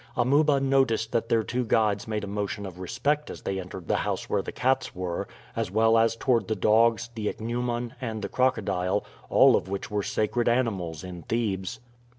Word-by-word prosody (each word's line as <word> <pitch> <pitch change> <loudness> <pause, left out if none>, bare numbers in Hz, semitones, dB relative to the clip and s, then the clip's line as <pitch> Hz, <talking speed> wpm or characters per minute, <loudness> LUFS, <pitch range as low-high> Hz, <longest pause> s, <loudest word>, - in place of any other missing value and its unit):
Amuba 140 +4 +3
noticed 135 -5 +2
that 115 0 0
their 115 -1 +3
two 125 +3 -1
guides 110 -3 +1
made 105 -1 -2
a - - -4
motion 100 +1 -3
of 90 -2 -9
respect 140 +10 -1
as - - -8
they 95 0 -2
entered 90 -2 -8
the - - +2
house - - -2
where - - +1
the - - -6
cats 130 -3 0
were, 90 -1 -3 0.3
as - - -1
well 110 +1 +3
as 115 0 +3
toward 115 -4 +1
the 110 - 0
dogs, 115 +3 +3
the 110 -2 -3
ichneumon, 120 +1 -2
and 110 -4 -4
the - - -1
crocodile, 100 -6 0 0.2
all - - +6
of 95 - -1
which 100 +2 -4
were 105 -1 0
sacred 110 +4 0
animals 95 -10 -1
in 90 -1 -7
Thebes. 110 +3 -2
110 Hz, 190 wpm, -27 LUFS, 100-120 Hz, 0.3 s, all